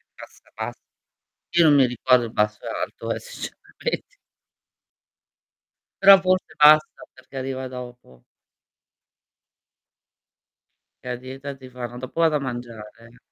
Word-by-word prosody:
bassa - - -15
bass - - -5 0.8
io 170 - +6
non 150 -2 +6
mi 135 -3 +5
ricordo 125 0 +2
il 115 - -7
basso 105 0 -1
e - - -5
alto, - - -5
eh - - -5
sinceramente. - - -7 1.9
Però 195 0 +9
forse 185 0 0
bassa 155 +1 +5
perché 130 +1 -13
arriva 130 0 -4
dopo. 125 - -11 2.8
La 125 -1 -4
dieta 135 +2 -8
ti 130 -1 -13
fanno 120 -1 -7
dopo 130 +6 -7
vado 160 -2 +3
a - - +1
mangiare, 120 -3 -6
va 105 0 -10 0.2
bene. 120 +2 -18
130 Hz, 125 wpm, -23 LUFS, 120-140 Hz, 2.8 s, Però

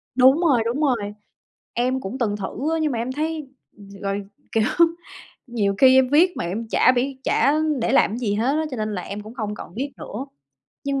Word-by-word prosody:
Đúng 260 +4 +6
rồi, 275 -9 +3
đúng 245 +6 -1
rồi. 265 -5 +3 0.8
Em 255 +2 0
cũng 245 +4 -5
từng 210 -4 0
thử 270 +10 -3
á, 325 - +1
nhưng 305 -3 +1
mà 230 - -2
em 245 +3 -2
thấy, 310 0 -3 0.3
ừm, 200 -2 -14
rồi, 200 0 -2 0.3
kiểu, 225 - +2 0.8
nhiều 210 -5 0
khi 260 -1 +7
em 260 - +4
viết 335 +7 +4
mà - - -2
em 205 +7 -3
chả 255 - +5
biết, 260 +2 -1
chả 280 - +3 0.3
để 230 - 0
làm 230 -5 +3
gì 215 -5 -1
hết 235 +6 +1
á, 315 - 0
cho 255 - -5
nên 215 -1 -2
là 180 - -3
em 200 +3 -6
cũng 220 +3 -11
không 210 -4 -3
còn 170 - -10
viết 275 +3 -3
nữa. 255 +6 -6 0.6
Nhưng 275 -1 0
250 Hz, 220 wpm, -23 LUFS, 215-275 Hz, 0.8 s, khi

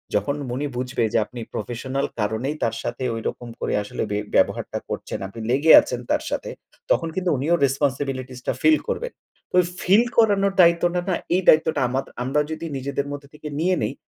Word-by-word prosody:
যখন 140 0 +1
মনি 130 +4 -2
বুঝবে 125 -1 -1
যে - - +4
আপনি 125 -1 -10
প্রফেশনাল 130 +5 -3
কারণেই 110 +8 -1
তার 115 0 0
সাথে 120 +2 -4
ঐরকম 120 +1 -5
করে - - -2
আসলে 105 - -4
ব্যব 105 0 -1
ব্যবহারটা - - +1
করছেন। - - -4
আপনি 115 +4 -10
লেগে 145 +5 +4
আছেন - - -4
তার - - +1
সাথে, - - -3 0.4
তখন 165 - +2
কিন্তু 185 -1 0
উনিও 160 +6 +2
রেসপনসিবিলিটিসটা 130 -2 -2
ফিল 315 -1 +6
করবেন। - - -2 0.4
তো - - -3 0.3
ফিল 200 +6 +5
করানোর 200 -3 +4
দায়িত্বটা 175 +1 +3
না, 175 - +2 0.2
এই 185 - +2
দায়িত্বটা 155 -2 +5
আমার। 135 +2 -1 0.2
আমরা 135 +4 +1
যদি 160 +1 -5
নিজেদের 140 +1 -3
মধ্যে 145 -1 -7
থেকে 150 0 -9
নিয়ে 180 +2 +2
নেই - - -1
140 Hz, 175 wpm, -23 LUFS, 125-170 Hz, 0.4 s, ফিল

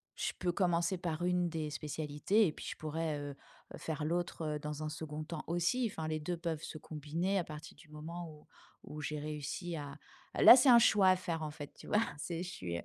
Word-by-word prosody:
je - - -1
peux 180 -1 +1
commencer 175 0 +2
par 170 -1 -3
une 180 -1 +2
des 160 -2 -3
spécialités 150 +7 +1
et 155 - -2
puis - - -9
je - - -5
pourrais, 155 0 -2
heu, 145 -1 -6 0.4
faire 155 -1 -3
l'autre, 170 +1 -1
heu, - - -3
dans 150 0 -5
un - - -2
2nd 155 0 -5
temps 160 -1 -5
aussi, 175 +9 +1
enfin 160 -5 -4
les 155 0 -1
2 175 +3 -2
peuvent 165 -2 -3
se - - -6
combiner 160 +6 -2
à 185 - +1
partir 155 0 -9
du 160 - -17
moment, 165 +3 -6
où 150 -1 -16 0.4
où 150 0 -6
j'ai 150 0 -3
réussi 150 +4 -4
à 145 -2 -6 0.4
là - - +12
c'est 265 +1 +5
un 240 - +10
choix 205 -4 +6
à 185 - +6
faire, 170 -3 -3
en 155 - -2
fait, 145 -1 -9
tu - - -13
vois? - - +2 0.2
C'est 170 +3 -3
je 180 - -5
suis 85 - -4
160 Hz, 225 wpm, -34 LUFS, 150-175 Hz, 0.4 s, là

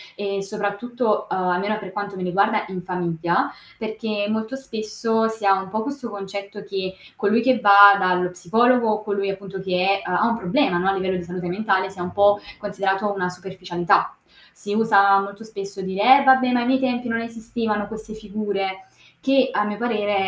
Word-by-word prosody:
e 200 -1 -3
soprattutto 210 +3 -2
ehm - - -1 0.2
almeno 205 +3 -1
per 190 -3 -9
quanto 205 -1 -5
mi 185 - -5
riguarda 200 +4 +1
in 185 -1 -6
famiglia, 175 -2 -1 0.3
perché 215 -1 -3
molto 220 +3 -2
spesso 225 -2 -1
si 225 -2 -6
ha 195 - +6
un 190 - -9
po' 220 +2 -2
questo 280 -4 -6
concetto 200 0 -7
che 195 -2 -4 0.2
colui 215 +2 +2
che 255 +1 +2
va 200 -1 +9
dallo 180 -2 +1
psicologo, 220 +5 +2
colui 200 -1 -2
appunto 195 0 -6
che 190 +1 +1
è - - -6
ha 180 +1 +1
ha 220 - +3
un 230 - +1
problema 185 0 +1
no, 185 +2 +1
a - - +2
livello 190 -1 -1
di 180 - -4
salute 180 +1 -6
mentale 190 0 0
sia 190 -2 -7
un 180 - -5
po' 205 0 +4 0.2
considerato 200 0 -1
una 180 -2 -2
superficialità. 180 -1 -1 0.4
Si 205 - -6
usa 200 -3 +5
molto 200 +2 -8
spesso 200 -3 -8
dire: 200 +8 +5
"Eh, - - 0
vabbè 260 -1 +5
ma 250 - +2
ai - - -1
miei 260 +1 +3
tempi 250 -2 -1
non 230 -1 -1
esistevano 225 -2 -3
queste 220 0 -8
figure" 200 -3 -4 0.4
che 270 -1 +2
a 210 - +1
mio 210 0 -4
parere 215 -3 -1
205 Hz, 190 wpm, -22 LUFS, 190-225 Hz, 0.4 s, va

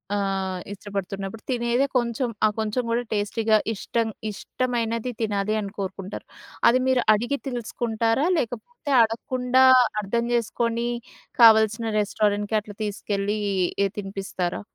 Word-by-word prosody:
ఆహ్, 195 -2 -1
ఇష్టపడుతున్నప్పుడు 195 +1 -5
తినేదే 240 +2 +1
కొంచెం, 240 +1 0 0.2
ఆ - - +6
కొంచెం 220 +3 -1
కూడా 235 +1 +1
టేస్టీగా 215 +1 +2 0.2
ఇష్టం 230 +3 -1 0.2
ఇష్టమైనది 230 +1 -2
తినాలి 210 -1 0
అని 200 -1 -5
కోరుకుంటారు. 195 0 -5 0.4
అది 250 +2 +4
మీరు 260 -1 +3
అడిగి 240 +7 0
తెలుసుకుంటారా? 230 +1 -1
లేకపోతే 285 - -4
అడగకుండా 250 +3 +2 0.4
అర్థం 235 +4 -1
చేసుకొని 235 0 0 0.5
కావలసిన 220 0 +6
రెస్టారెంట్‍కి 205 0 0
అట్లా 205 -1 -11
తీసుకెళ్ళి 205 0 -2 0.5
ఎ - - +3
తినిపిస్తారా? 195 -2 -4
220 Hz, 110 wpm, -24 LUFS, 205-235 Hz, 0.5 s, ఆ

